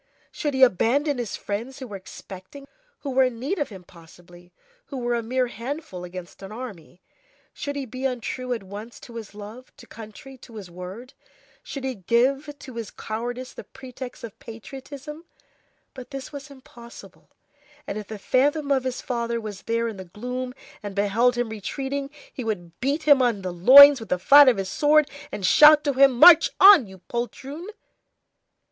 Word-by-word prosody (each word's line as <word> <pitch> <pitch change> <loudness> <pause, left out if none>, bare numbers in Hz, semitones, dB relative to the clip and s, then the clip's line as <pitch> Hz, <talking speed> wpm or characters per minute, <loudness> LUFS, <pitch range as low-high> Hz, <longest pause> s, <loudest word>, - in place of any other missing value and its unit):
Should 295 -3 -3
he 265 - +4
abandon 260 - +2
his 235 -4 -4
friends 230 +6 -5
who 265 - -8
were 210 -5 -9
expecting 190 +6 -11
him? - - -17 0.3
Who 280 - -5
were 260 0 +3
in 250 -2 -3
need 305 +10 -3
of 290 - -2
him 190 -4 -11
possibly! 175 +1 -18 0.4
who 275 - -7
were 240 -1 -2
a 235 - -1
mere 250 +3 -1
handful 240 - -7
against 180 +1 -10
an 195 +1 -9
army! 200 -7 -10 0.5
Should 285 -1 -5
he 280 -1 -4
be 255 +2 -7
untrue 255 0 -4
at 235 -4 -3
once 205 +5 -10
to 235 -1 -11
his 215 -3 -10
love, 215 +5 -11
to - - -14
country, 230 +5 -12
to 235 -2 -15
his 195 -5 -9
word? 190 +9 -10 0.5
Should 275 - -8
he 265 -1 -2
give 265 - 0
to 260 -4 -11
his 225 -3 -5
cowardice 245 +3 -6
the - - -9
pretext 260 -1 -10
of 225 -3 -10
patriotism? 275 +7 -10 0.7
But 255 -2 -11
this 275 0 -8
was 285 0 -9
impossible, 260 -4 -15 0.6
and - - -5
if 210 - -9
the 220 - -7
phantom 285 +7 0
of 265 -2 +1
his 255 -1 -3
father 235 -2 -3
was 210 -4 -8
there 230 0 -1
in 220 -3 -6
the 190 - -9
gloom, 250 +7 -6 0.3
and 205 -2 -7
beheld 220 +5 +2
him 240 -1 -2
retreating, 270 +6 -5 0.2
he 255 - -6
would 175 -7 -5
beat 280 +5 -1
him 285 -3 +5
on 230 -6 0
the 180 -1 -4
loins 275 +10 +9
with 225 - -10
the 180 - +1
flat 280 +9 +7
of 240 - +1
his 195 -1 -3
sword, 300 +2 +3 0.2
and 195 - -4
shout 300 +8 +7
to 285 -2 0
him: 270 0 +5
"March 320 +6 +8
on, 385 - +8
you 190 0 -13
poltroon!" 270 - -6
245 Hz, 185 wpm, -24 LUFS, 210-275 Hz, 0.7 s, loins